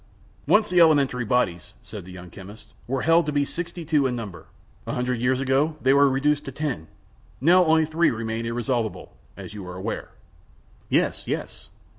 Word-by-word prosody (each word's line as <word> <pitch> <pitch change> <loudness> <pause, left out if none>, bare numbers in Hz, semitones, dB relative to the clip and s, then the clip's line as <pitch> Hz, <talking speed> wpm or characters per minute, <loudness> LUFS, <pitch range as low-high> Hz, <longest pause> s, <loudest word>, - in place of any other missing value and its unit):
"Once 210 0 +4
the 180 - +4
elementary 140 -6 +4
bodies," 105 -7 -1
said - - -9
the 95 - -11
young 90 -1 -11
chemist, 105 +3 -13
"were 130 +1 -2
held 165 0 +4
to - - 0
be 145 -1 +1
sixty 170 +2 -5
two 150 -3 +2
in 125 - -2
number; 105 -7 -8 0.4
a - - -2
hundred 125 -1 -1
years 130 +1 +1
ago 135 +4 +1
they 130 -1 +3
were 140 0 +5
reduced 145 +2 +1
to 135 - -5
ten; 135 - -4 0.5
now 180 +6 +5
only 160 0 +4
three 160 +2 +2
remain 115 0 -3
irresolvable, 120 -1 -3 0.2
as - - -9
you 105 -2 -7
are 90 - -7
aware." 95 - -5 0.8
"Yes, - - +1
yes." - - -5
130 Hz, 180 wpm, -24 LUFS, 110-150 Hz, 0.8 s, were